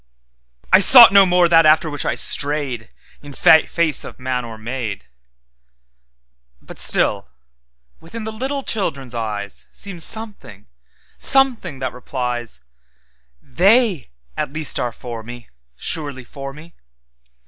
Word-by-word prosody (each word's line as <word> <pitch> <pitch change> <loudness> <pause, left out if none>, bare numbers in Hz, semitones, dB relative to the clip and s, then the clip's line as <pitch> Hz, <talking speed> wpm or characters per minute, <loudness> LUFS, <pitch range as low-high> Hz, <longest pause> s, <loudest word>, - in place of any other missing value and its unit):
'I 185 - +8
sought 235 +1 +8
no 200 -1 +6
more 180 -1 +3
that 165 -1 +4
after 155 +1 +3
which 145 -1 -4
I - - -1
strayedIn 140 -6 -1 0.8
face 165 -5 0
of - - -11
man 130 -1 -3
or 115 -2 -10
maid; 115 -2 -6 1.5
But - - -14
still - - +1 0.7
within 215 +8 -10
the 220 - -6
little 270 +5 -5
children's 140 - -3
eyesSeems 110 - -6
something, 205 - -1 0.5
something 250 - +4
that 130 -1 -5
replies, 125 - -6 0.8
They 195 - +1 0.3
at - - -4
least 155 0 -2
are 120 - -2
for 115 0 -9
me, 120 +1 -12 0.3
surely 140 - -4
for 135 +3 -9
me! 155 +4 -15
145 Hz, 115 wpm, -18 LUFS, 120-190 Hz, 1.5 s, I